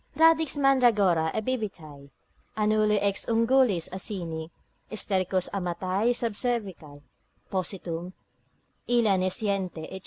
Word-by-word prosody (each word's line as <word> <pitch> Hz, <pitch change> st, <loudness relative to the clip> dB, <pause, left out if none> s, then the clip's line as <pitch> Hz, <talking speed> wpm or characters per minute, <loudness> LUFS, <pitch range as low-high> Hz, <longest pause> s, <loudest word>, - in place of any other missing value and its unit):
Radix 320 Hz, -1 st, +4 dB
mandragora 220 Hz, -, +3 dB
ebibitae, 190 Hz, -, -4 dB, 0.5 s
Annuli 215 Hz, 0 st, +2 dB
ex 200 Hz, -1 st, -1 dB
ungulis 230 Hz, -5 st, +3 dB
Asini, 175 Hz, -5 st, -5 dB, 0.4 s
Stercus 190 Hz, -3 st, -1 dB
amatae 185 Hz, +4 st, 0 dB
sub 235 Hz, -2 st, -2 dB
cervical 190 Hz, -12 st, -4 dB, 0.5 s
positum, 180 Hz, -2 st, -3 dB, 0.8 s
illa 235 Hz, -5 st, +3 dB
nesciente, 185 Hz, -3 st, -2 dB
&c. 190 Hz, -, -6 dB
200 Hz, 90 wpm, -27 LUFS, 180-230 Hz, 0.8 s, Radix